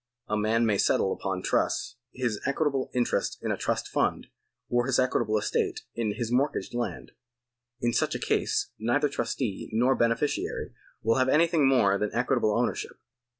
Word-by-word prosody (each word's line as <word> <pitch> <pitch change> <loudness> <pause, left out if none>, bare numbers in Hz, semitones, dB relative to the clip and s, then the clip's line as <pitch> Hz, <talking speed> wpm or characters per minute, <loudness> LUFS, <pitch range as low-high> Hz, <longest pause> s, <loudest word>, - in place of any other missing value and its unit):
A 105 - 0
man 110 +2 +2
may 105 -3 +1
settle 95 - +2
upon 95 -1 -3
trust - - 0 0.2
his 120 -5 -2
equitable 140 -1 0
interest 125 -1 0
in - - -1
a - - +1
trust - - -2
fvind, - - +1 0.4
or 120 +1 +1
his 130 - +2
equitable 120 -4 +1
estate 105 - -1
in 110 -3 -2
his 115 +1 -3
mortgaged 135 +2 0
land. 120 0 -4 0.7
In 120 0 +1
such - - +1
a - - -2
case - - 0
neither 120 +6 +1
trustee 115 -5 -3
nor 125 +4 +3
beneficiary 115 +4 -1 0.3
will 115 +2 +3
have 130 0 +3
anything 160 -1 +4
more 100 -7 +3
than 105 - 0
equitable 120 -2 +2
ownership. 120 0 -2
120 Hz, 160 wpm, -27 LUFS, 110-130 Hz, 0.7 s, anything